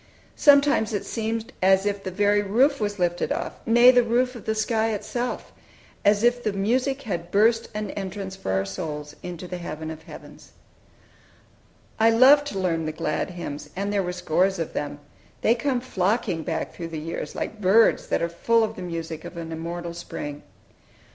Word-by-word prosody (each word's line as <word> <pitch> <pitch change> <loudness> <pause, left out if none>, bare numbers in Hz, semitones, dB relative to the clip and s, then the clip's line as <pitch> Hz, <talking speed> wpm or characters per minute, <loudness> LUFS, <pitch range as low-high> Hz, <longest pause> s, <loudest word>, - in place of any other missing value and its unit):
Sometimes 285 -6 +4
it 205 - -2
seemed 225 0 -3
as 190 +1 +4
if 200 -1 -1
the 190 - -3
very 205 +2 +2
roof 255 +8 +2
was 205 -1 -1
lifted 175 -1 0
off, - - -3
nay, 240 +2 +7
the 250 -1 +5
roof 245 +2 +1
of 235 - -11
the 220 - 0
sky 220 0 +1
itself 240 +4 -4 0.5
as 205 +1 +3
if 240 +1 +3
the 215 - 0
music 255 +8 0
had 175 -7 -4
burst 225 +4 +3
an 210 0 -3
entrance 195 -1 -5
for 190 - -4
our 95 +1 +1
souls 150 +9 -6
into 180 0 -7
the 180 0 -5
heaven 160 -1 -6
of 160 - -9
heavens. - - -13 1.5
I 225 +1 +6
loved 270 +5 +6
to 200 - -5
learn 165 -4 0
the - - -1
glad 155 +2 -2
hymns, 150 -5 -7
and 200 +2 -2
there 200 - +2
were 180 -1 -2
scores 180 +2 +1
of 165 -2 -4
them. 145 0 -3 0.4
They 225 - +4
come 250 +1 0
flocking 200 -6 0
back 160 0 -3
through 170 - -6
the 165 -1 -5
years, 155 -1 -5
like 215 0 -5
birds 210 +4 +4
that - - 0
are - - +2
full 225 +7 +2
of 220 - -2
the - - -8
music 165 -2 -5
of 175 - -9
an 165 -1 -6
immortal 170 +1 -5
spring! 145 -4 -6
195 Hz, 185 wpm, -24 LUFS, 170-225 Hz, 1.5 s, nay